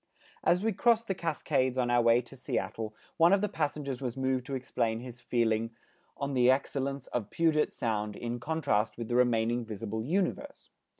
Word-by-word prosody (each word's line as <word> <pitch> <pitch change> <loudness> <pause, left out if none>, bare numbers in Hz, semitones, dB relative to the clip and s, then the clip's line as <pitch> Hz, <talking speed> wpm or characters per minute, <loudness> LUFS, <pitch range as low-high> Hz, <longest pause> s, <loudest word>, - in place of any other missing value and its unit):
As 180 +3 +3
we 225 0 +1
crossed 230 +3 +3
the 195 - +1
Cascades 140 -6 0
on 120 -1 +1
our 120 0 +4
way 115 +1 +5
to 125 +2 -14
Seattle, 110 -3 -3 0.2
one 170 +3 +6
of 200 - +4
the 210 - +1
passengers 145 -6 -3
was 125 -1 -3
moved 130 -1 0
to 140 - -3
explain 115 -3 -1
his 120 0 -9
feeling 115 -1 0 0.4
on 140 0 -3
the 125 -1 +4
excellence 140 +1 0
of 110 -4 -3
Puget 160 -2 +2
Sound 105 -3 -2
in 120 0 -4
contrast 120 -7 0
with 115 -2 -5
the 120 - 0
remaining 120 -1 +2
visible 110 0 -4
Universe. 200 - -2
125 Hz, 180 wpm, -30 LUFS, 115-150 Hz, 0.4 s, one